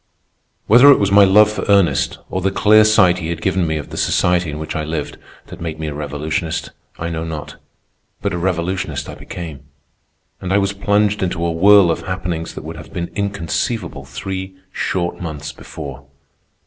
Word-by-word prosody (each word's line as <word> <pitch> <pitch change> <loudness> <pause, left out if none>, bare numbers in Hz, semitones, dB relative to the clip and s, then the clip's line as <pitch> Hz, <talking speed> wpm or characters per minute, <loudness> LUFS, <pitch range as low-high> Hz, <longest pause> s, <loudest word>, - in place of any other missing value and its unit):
Whether 125 +6 +7
it - - +6
was 100 -1 +1
my 100 0 +7
love 105 +2 +5
for 105 - -4
Ernest, 95 -8 +3
or 95 - -2
the 95 - +1
clear 110 +2 +5
sight 95 -5 +4
he 80 -1 -4
had 85 -1 -3
given 95 -1 0
me 80 0 -1
of 75 - -7
the - - -6
society 90 -2 +1
in 75 - -5
which 80 0 -5
I 80 - -1
lived, 75 -1 -4 0.3
that - - -11
made 80 -2 -5
me 80 -1 -3
a - - -5
revolutionist, 75 +3 -3 0.3
I 85 +1 -4
know 80 0 -3
not; 80 -2 -6 0.6
but - - -2
a - - -1
revolutionist 90 +1 -2
I - - -7
became, 80 -5 -8 0.8
and 95 - -4
I 100 - +4
was 100 0 +1
plunged 105 +1 +1
into 90 -2 -1
a 85 - 0
whirl 95 +1 +6
of - - -2
happenings 90 -3 -4
that - - -7
would - - -7
have - - -11
been 85 -1 -4
inconceivable 100 - -3
three 95 +8 -6 0.2
short 90 -2 -2
months 75 -3 -5
before. 70 -3 -9
90 Hz, 190 wpm, -19 LUFS, 80-100 Hz, 0.8 s, Whether